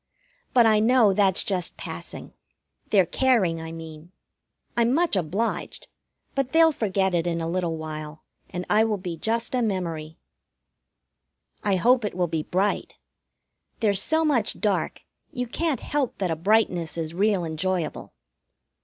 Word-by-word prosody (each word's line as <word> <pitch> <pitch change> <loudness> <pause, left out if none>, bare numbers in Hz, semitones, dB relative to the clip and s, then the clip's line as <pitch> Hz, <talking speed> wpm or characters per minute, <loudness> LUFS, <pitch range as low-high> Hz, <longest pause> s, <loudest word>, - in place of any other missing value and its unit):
But 240 -2 +7
I 215 -1 +5
know 225 -2 +4
that's 190 -2 +3
just 185 -4 -2
passing - - -7 0.6
their 195 -4 +4
caring, 195 -10 +2
I 160 0 -6
mean. 160 0 -10 0.6
I'm 235 +2 +2
much 335 -6 +2
obliged; 190 +6 -2 0.5
but 275 0 -2
they'll 325 0 +6
forget 195 -7 0
it 170 0 +1
in 170 -1 -1
a 165 - -2
little 170 -1 -1
while, 155 -1 -7 0.3
and 180 +1 -5
I 215 +1 +4
will 220 -2 0
be 180 -3 -5
just 230 +9 -2
a 250 - +1
memory. 165 -7 -3 1.5
I 200 -2 +2
hope 240 +6 +3
it 210 - -3
will 180 -1 +1
be 165 -2 -2
bright. 190 +6 -1 0.8
There's 200 -3 +2
so 320 +5 +2
much 245 -8 +2
dark 205 -3 -1 0.3
you 250 -5 -3
can't 310 +4 -1
help 285 -4 -2
that 185 -3 -1
a - - 0
brightness 175 -3 +1
is 160 -1 -3
real 195 -1 +1
enjoyable. 165 0 -3
190 Hz, 150 wpm, -25 LUFS, 165-230 Hz, 1.5 s, But